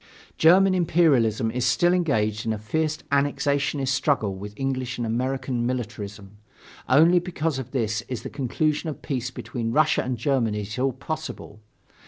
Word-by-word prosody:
German 185 +4 +5
imperialism 140 - +2
is 125 +1 -2
still 150 +9 +3
engaged 110 - 0
in 110 - -1
a - - -3
fierce 155 +9 -1
annexationist 140 -1 +1
struggle 130 -6 +1
with 100 +2 -7
English 130 -2 -2
and 120 - -2
American 130 +1 -1
militarism. 105 -5 -5 0.5
Only 165 +7 +6
because 165 -5 -2
of 130 -2 -6
this 115 -5 -1
is 120 -4 -5
the - - -5
conclusion 150 +4 -1
of 150 - -8
peace 130 -3 -2
between 115 -2 -4
Russia 150 +3 +3
and 125 -1 -3
Germany 115 -8 0
at 105 +4 -6
all 135 +1 +2
possible. 155 -4 -6
130 Hz, 155 wpm, -24 LUFS, 115-150 Hz, 0.5 s, Only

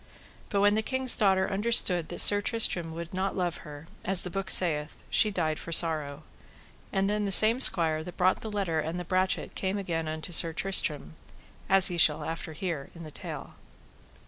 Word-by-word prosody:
But 200 - -1
when 205 0 +3
the 215 - -1
king's 260 +2 +3
daughter 190 -2 +1
understood 195 -5 +1
that - - 0
Sir 205 0 +4
Tristram 185 -6 -1
would 170 +1 -9
not 190 +2 -4
love 175 -2 -3
her, 150 -1 -13 0.2
as 190 -1 -1
the 180 - -6
book 195 0 -6
saith, 150 -4 +3
she 215 - +3
died 160 -6 -3
for - - -10
sorrow. 155 -3 +1 0.7
And 195 -1 -1
then 210 0 -2
the 200 - -4
same 220 +5 +6
squire 160 -10 +4
that 175 +1 -12
brought 185 +1 +1
the 220 - -7
letter 195 -6 -3
and 160 +3 -5
the 180 - -8
brachet 185 +2 -2
came 190 +1 -4
again 165 -5 -5
unto 155 +2 -7
Sir 165 -1 +3
Tristram, 155 - -3 0.5
as 195 0 +4
after - - -5
ye - - -5
shall 160 +1 +1 0.2
hear 160 -5 -6
in 170 - -11
the 155 - -11
tale. - - -9
180 Hz, 195 wpm, -26 LUFS, 160-195 Hz, 0.7 s, same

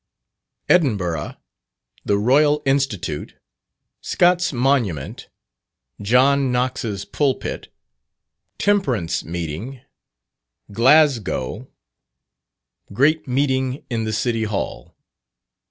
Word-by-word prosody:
_Edinburgh 100 - +1 0.7
The 100 - +2
Royal 145 +7 +3
Institute 135 - -1 0.7
Scott's 180 +1 +2
Monument 120 - -1 0.7
John 130 +5 +3
Knox's 125 -5 -2
Pulpit 140 -3 -2 0.9
Temperance 130 - 0
Meeting 85 - -6 0.9
Glasgow 120 - +2 1.2
Great 150 +9 +2
Meeting 130 0 -1
in 115 -2 -1
the 110 - -2
City 115 0 -1
Hall. 95 - -5
125 Hz, 70 wpm, -21 LUFS, 100-140 Hz, 1.2 s, Royal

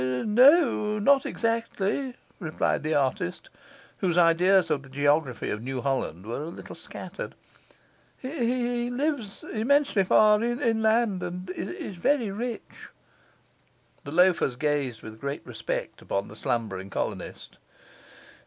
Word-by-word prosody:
'No, 215 - +4
not 270 +6 +4
exactly,' 230 +2 -1 0.2
replied 160 -5 -1
the 155 +1 -1
artist, 130 -10 -1 0.5
whose 180 -3 0
ideas 180 +2 +4
of 140 - +1
the 135 - -15
geography 145 -1 +1
of 105 - -3
New 130 +2 -4
Holland 120 - -2
were 115 +5 -4
a 155 - -5
little - - -9
scattered. - - -8 0.8
'He 245 -3 -1
lives 250 -5 -2
immensely 250 -1 +3
far 210 +3 +5
inland, 230 -4 +1
and 180 +1 -5
is 295 - -6
very 235 +2 +1
rich.' 230 +3 -6 1.1
The 140 - -7
loafers 175 -6 +3
gazed 140 -4 -1
with 110 0 -10
great 140 +1 -4
respect 110 -3 -4
upon 100 +1 -2
the 105 - -11
slumbering 100 -4 -3
colonist. - - -5
185 Hz, 120 wpm, -27 LUFS, -, 1.1 s, far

